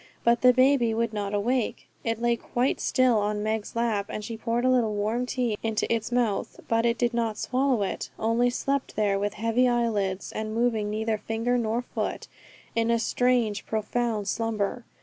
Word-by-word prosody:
But 235 0 +3
the 250 - +7
baby 255 -3 +3
would 230 -1 0
not 205 -1 -2
awake. 230 +4 -1 0.2
It 230 -1 -1
lay 235 0 +2
quite 245 +3 -1
still 255 -4 +3
on 210 0 -1
Meg's 215 0 -2
lap, 225 -4 0
and 210 - -5
she 230 - -5
poured 235 +2 -1
a - - +4
little 230 -4 +2
warm 220 +5 -1
tea 240 -5 -1
into 225 -1 0
its 225 +1 -2
mouth, 235 -5 0
but 230 +1 +2
it 235 0 +1
did 240 +1 +1
not 230 -2 -1
swallow 255 -3 +1
it, 195 - -3
only 230 +2 +2
slept 275 +2 -2
there 200 -2 +1
with 205 +1 -2
heavy 230 +3 +2
eyelids, 210 -6 0
and 215 0 -4
moving 225 -3 +1
neither 220 0 -1
finger 225 +3 -1
nor 235 0 0
foot, - - -4 0.5
in 230 0 +1
a 235 - +3
strange, 235 -3 +1
profound 220 -1 -1
slumber. 225 +2 -1
230 Hz, 185 wpm, -26 LUFS, 215-245 Hz, 0.5 s, the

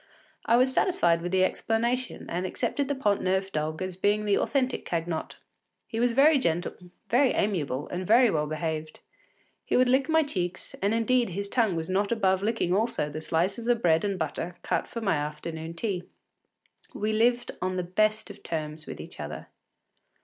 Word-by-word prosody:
I 230 - +5
was 255 +2 +3
satisfied 170 - +2
with 175 +1 -3
the 190 0 +3
explanation 235 +6 -1
and 175 +2 -2
accepted 270 +9 -1
the 285 - -1
Pont 205 -7 +1
Neuf 190 +1 0
dog 155 +2 -2
as 185 -1 -4
being 205 +3 +1
the 205 -1 +3
authentic 260 -3 0
Cagnotte. 165 -1 -3 0.5
He 225 - -4
was 240 0 +2
very 285 +3 +6
gentle, 170 -5 0 0.4
very 255 +2 +4
amiable, 150 -9 -1
and 180 0 -4
very 235 +1 +6
well 150 -3 0
behaved. 155 0 -4 0.6
He - - +1
would 255 0 +5
lick 265 +4 +2
my 320 0 +4
cheeks, 180 - -4
and 200 +3 +2
indeed 240 +1 +2
his 200 +3 -4
tongue 220 -7 +2
was 160 -1 -2
not 200 +3 0
above 190 -5 +2
licking 210 -4 0
also 210 -7 0
the 155 +1 -5
slices 180 +9 -1
of 240 -1 +2
bread 165 -1 +4
and 200 -2 -1
butter 175 -1 -3
cut - - -1
for 230 - -6
my 195 -7 +1
afternoon 160 +2 -5
tea. 180 -2 -3 0.9
We 215 +1 -1
lived 240 +2 +2
on 185 0 -1
the 180 - -1
best 215 +4 0
of 205 - -14
terms 155 -1 -4
with - - -7
each - - -10
other. - - -6
195 Hz, 185 wpm, -27 LUFS, 170-235 Hz, 0.9 s, very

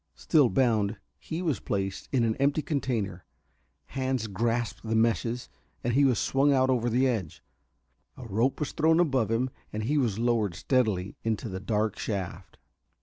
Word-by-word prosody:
Still 150 -7 +3
bound, 110 -6 +2 0.2
he 165 +3 -5
was 155 -7 0
placed 95 -1 -3
in 130 -3 +2
the 110 - -5
empty 145 +2 +2
container. 110 - -2 0.7
Hands 130 -3 -1
grasped 115 +3 -1
the 110 0 -2
meshes, 115 +2 +1 0.4
and 120 - 0
he 140 +3 +4
was 125 -4 +3
swung 140 +2 +2
out 130 -1 +3
over 120 -1 +1
the 125 +3 +3
edge. 110 -11 -3 0.7
A 125 - -9
rope 115 +5 0
was 150 - -3
above 155 - +3
him: 120 +3 0 0.2
he 115 +8 0
was 115 -7 0
lowered 115 -6 +1
steadily 105 -6 0
into 115 0 -1
the 95 -2 -5
dark 105 +1 -1
shaft. 95 -3 -4
115 Hz, 155 wpm, -28 LUFS, 105-130 Hz, 0.7 s, he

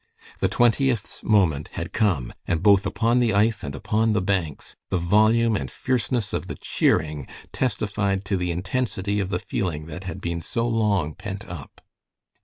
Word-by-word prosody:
The - - +2
Twentieth's 120 -1 +1
moment 85 -9 +2
had - - -5
come, 90 - +1
and 85 0 0
both 100 -2 +5
upon 120 +1 +2
the 120 -3 +2
ice 105 +1 +2
and 70 - -5
upon 110 +9 +1
the 105 - +2
banks 90 -7 -2
the 95 - +1
volume 110 +6 +3
and 65 -9 -3
fierceness 125 - -1
of - - -2
the - - -5
cheering 75 -3 0 0.3
testified 100 -4 -1
to 100 - 0
the 90 -1 -1
intensity 100 +2 -1
of 95 -2 -1
the 90 - 0
feeling 85 -4 -3
that 80 +4 -8
had 95 +1 -5
been 85 -2 -3
so 115 +7 -1
long 105 -9 +1
pent 100 +3 -7
up. 85 -6 -9
100 Hz, 170 wpm, -24 LUFS, 85-110 Hz, 0.3 s, both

